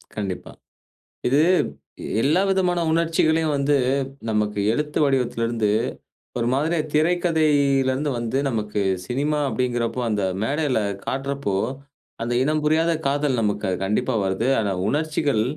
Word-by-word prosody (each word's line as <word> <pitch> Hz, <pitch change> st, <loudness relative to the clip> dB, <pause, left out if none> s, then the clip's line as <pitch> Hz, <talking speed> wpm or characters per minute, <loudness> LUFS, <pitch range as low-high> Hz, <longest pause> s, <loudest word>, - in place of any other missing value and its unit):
கண்டிப்பா. 100 Hz, -4 st, -4 dB, 0.8 s
இது 140 Hz, +4 st, +3 dB, 0.8 s
எல்லா 155 Hz, +6 st, +3 dB
விதமான 180 Hz, -2 st, +1 dB
உணர்ச்சிகளையும் 160 Hz, -1 st, +2 dB
வந்து, 140 Hz, +1 st, +2 dB, 0.5 s
நமக்கு 105 Hz, -1 st, 0 dB
எழுத்து 150 Hz, +4 st, -1 dB
வடிவத்திலிருந்து 115 Hz, -5 st, 0 dB, 0.7 s
ஒரு 120 Hz, -, 0 dB
மாதிரியா 155 Hz, +4 st, +1 dB
திரைக்கதையிலேருந்து 150 Hz, -4 st, +2 dB
வந்து 120 Hz, +2 st, -2 dB
நமக்கு 105 Hz, -3 st, -2 dB, 0.3 s
சினிமா 145 Hz, +4 st, 0 dB
அப்டிங்கிறப்போ, 125 Hz, -1 st, -1 dB
அந்த 105 Hz, -2 st, 0 dB, 0.2 s
மேடையில 140 Hz, 0 st, 0 dB, 0.3 s
காட்டுறப்போ 135 Hz, -6 st, -2 dB, 0.7 s
அந்த 120 Hz, +1 st, -2 dB
இனம் 155 Hz, +1 st, +1 dB
புரியாத 160 Hz, +2 st, +2 dB, 0.2 s
காதல் 140 Hz, -2 st, +1 dB
நமக்கு 105 Hz, -2 st, -1 dB
கண்டிப்பா 115 Hz, +6 st, 0 dB
வருது. 95 Hz, +5 st, -1 dB
ஆனா, 105 Hz, -2 st, 0 dB, 0.2 s
உணர்ச்சிகள் 145 Hz, -5 st, 0 dB
140 Hz, 110 wpm, -23 LUFS, 115-155 Hz, 0.8 s, இது